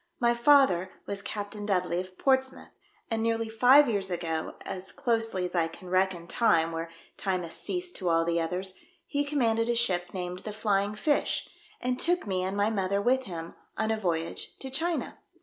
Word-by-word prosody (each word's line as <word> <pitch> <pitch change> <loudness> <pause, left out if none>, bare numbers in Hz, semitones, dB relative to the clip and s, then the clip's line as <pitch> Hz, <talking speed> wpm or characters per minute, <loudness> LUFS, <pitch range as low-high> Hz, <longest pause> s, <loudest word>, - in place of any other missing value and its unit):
My 240 -2 +4
father 235 -8 +4 0.2
was 200 0 -3
Captain 205 0 -4
Dudley, 180 -4 0
of 185 0 -7
Portsmouth, 265 -1 +1 0.4
and 225 0 0
nearly 230 0 0
five 255 +6 +6
years 200 -4 -1
ago, 165 -3 -3
as 185 0 -3
closely 225 -6 0
as 180 - -5
I 170 -2 +2
can 180 +2 -11
reckon 185 -2 +1
time 165 -4 +2
where 165 0 -4 0.3
time 185 -3 -1
has 165 - -6
ceased 360 -1 -3
to 180 -3 -1
all 165 0 +3
the 170 0 +1
others, 180 +3 -2 0.3
he 285 0 0
commanded 235 -6 +1
a 240 - +2
ship 185 -7 +2
named 180 -1 -4
the 215 - -6
Flying 205 -1 0
Fish, 290 +7 0 0.3
and 250 0 -1
took 355 +1 +2
me 190 -3 -1
and 190 +2 -2
my 205 +2 +2
mother 200 -1 0
with 255 +5 +2
him 165 -3 -6 0.2
on 220 0 0
a 220 - 0
voyage 170 -4 -2
to 265 - -6
China. 330 +5 -1
200 Hz, 185 wpm, -28 LUFS, 180-235 Hz, 0.4 s, five